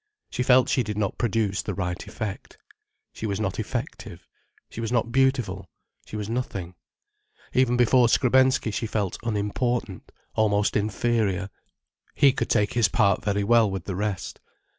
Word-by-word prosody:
She -, -, -2 dB
felt 125 Hz, 0 st, +5 dB
she 130 Hz, -, +2 dB
did 105 Hz, -3 st, -4 dB
not 100 Hz, -3 st, -2 dB
produce 105 Hz, -4 st, 0 dB
the -, -, -4 dB
right 90 Hz, -2 st, -4 dB
effect. 110 Hz, -4 st, -6 dB, 0.6 s
She 110 Hz, -, -4 dB
was 100 Hz, -1 st, -2 dB
not 100 Hz, -4 st, -2 dB
effective: -, -, -5 dB, 0.4 s
she 115 Hz, -, -7 dB
was 115 Hz, 0 st, -3 dB
not 120 Hz, -1 st, 0 dB
beautiful: 125 Hz, -8 st, +1 dB, 0.4 s
she -, -, -8 dB
was 105 Hz, -1 st, -3 dB
nothing. 105 Hz, -7 st, -4 dB, 0.8 s
Even 125 Hz, -1 st, +3 dB
before 120 Hz, 0 st, +5 dB
Skrebensky 130 Hz, -2 st, +3 dB
she 110 Hz, +3 st, -2 dB
felt 105 Hz, -3 st, -2 dB
unimportant, 110 Hz, -1 st, -2 dB, 0.2 s
almost 105 Hz, -1 st, +1 dB
inferior. 105 Hz, -2 st, 0 dB, 0.6 s
He 140 Hz, -2 st, +5 dB
could -, -, -2 dB
take 105 Hz, -1 st, +2 dB
his 120 Hz, -4 st, +3 dB
part 100 Hz, -2 st, +2 dB
very 100 Hz, -1 st, 0 dB
well 115 Hz, 0 st, +4 dB
with 95 Hz, -3 st, -5 dB
the 95 Hz, -, -4 dB
rest. 100 Hz, -1 st, -3 dB
110 Hz, 155 wpm, -25 LUFS, 100-120 Hz, 0.8 s, felt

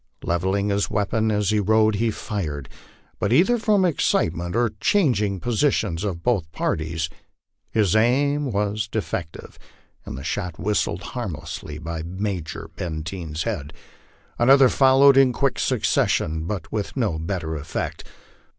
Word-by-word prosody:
Levelling 95 Hz, +4 st, 0 dB
his 100 Hz, 0 st, 0 dB
weapon 110 Hz, +2 st, 0 dB
as 105 Hz, -1 st, +1 dB
he 105 Hz, -, +2 dB
rode, 110 Hz, +2 st, +3 dB
he 115 Hz, +3 st, +1 dB
fired, 80 Hz, -, -4 dB, 0.5 s
but 100 Hz, -, 0 dB
either 195 Hz, -, +4 dB
from 210 Hz, -4 st, +3 dB
excitement 85 Hz, -, 0 dB
or 120 Hz, 0 st, +2 dB
the -, -, -20 dB
changing 110 Hz, -, +2 dB
positions 115 Hz, -, 0 dB
of 90 Hz, -5 st, -3 dB
both 100 Hz, -11 st, 0 dB
parties, 80 Hz, +1 st, -2 dB, 0.6 s
his 105 Hz, -3 st, +2 dB
aim 140 Hz, +5 st, +2 dB
was 105 Hz, +1 st, -1 dB
defective 95 Hz, -7 st, -5 dB, 0.4 s
and -, -, -7 dB
the 65 Hz, -, -7 dB
shot 85 Hz, +1 st, -3 dB
whistled 100 Hz, -1 st, -1 dB
harmlessly 80 Hz, -, -5 dB
by 80 Hz, +1 st, -5 dB
Major 90 Hz, 0 st, -4 dB
Benteen's 80 Hz, -1 st, -4 dB
head. 75 Hz, +2 st, -4 dB, 0.7 s
Another 135 Hz, +2 st, +6 dB
followed 135 Hz, +1 st, +5 dB
in 135 Hz, -2 st, +6 dB
quick 135 Hz, +1 st, 0 dB
succession, 80 Hz, 0 st, +1 dB
but 95 Hz, -5 st, -5 dB
with 105 Hz, +4 st, -3 dB
no 105 Hz, -11 st, 0 dB
better 80 Hz, -2 st, -3 dB
effect. 75 Hz, +2 st, -4 dB
100 Hz, 135 wpm, -23 LUFS, 85-120 Hz, 0.7 s, Another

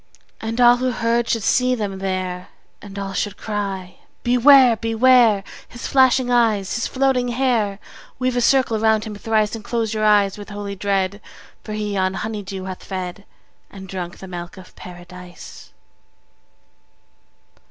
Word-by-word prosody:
And 225 Hz, +2 st, -4 dB
all 245 Hz, 0 st, +6 dB
who 255 Hz, +1 st, 0 dB
heard 235 Hz, 0 st, 0 dB
should 225 Hz, -3 st, 0 dB
see 255 Hz, +3 st, +2 dB
them 200 Hz, -4 st, -4 dB
there, 185 Hz, -1 st, -3 dB, 0.3 s
And 200 Hz, -1 st, -11 dB
all 195 Hz, -1 st, -4 dB
should 205 Hz, +1 st, -3 dB
cry, 195 Hz, -4 st, -5 dB, 0.2 s
Beware! 250 Hz, 0 st, +6 dB
Beware! 225 Hz, -1 st, +4 dB, 0.3 s
His 240 Hz, -, -9 dB
flashing 260 Hz, -1 st, +3 dB
eyes, 220 Hz, -5 st, +2 dB
his 230 Hz, -, -1 dB
floating 260 Hz, -2 st, +1 dB
hair! 240 Hz, -4 st, 0 dB
50 195 Hz, -, -19 dB, 0.3 s
Weave 255 Hz, 0 st, -1 dB
a -, -, +2 dB
circle 245 Hz, -3 st, +2 dB
round 220 Hz, -1 st, +2 dB
him 215 Hz, -, -6 dB
thrice, 215 Hz, 0 st, 0 dB
And 225 Hz, -2 st, -6 dB
close 230 Hz, -1 st, -2 dB
your 215 Hz, 0 st, -2 dB
eyes 205 Hz, -1 st, +3 dB
with 205 Hz, -, -9 dB
holy 205 Hz, -1 st, -6 dB
dread, 195 Hz, 0 st, -1 dB, 0.4 s
For 215 Hz, -, -6 dB
he 210 Hz, -1 st, -3 dB
on 185 Hz, 0 st, 0 dB
honey 215 Hz, +1 st, -4 dB
dew 190 Hz, -1 st, -7 dB
hath 185 Hz, -1 st, -7 dB
fed, 185 Hz, +1 st, -6 dB, 0.4 s
And 190 Hz, -1 st, -11 dB
drunk 180 Hz, -2 st, -6 dB
the 190 Hz, -, -10 dB
milk 175 Hz, 0 st, -8 dB
of 185 Hz, -1 st, -14 dB
Paradise. 180 Hz, 0 st, -12 dB
210 Hz, 160 wpm, -21 LUFS, 195-240 Hz, 0.4 s, all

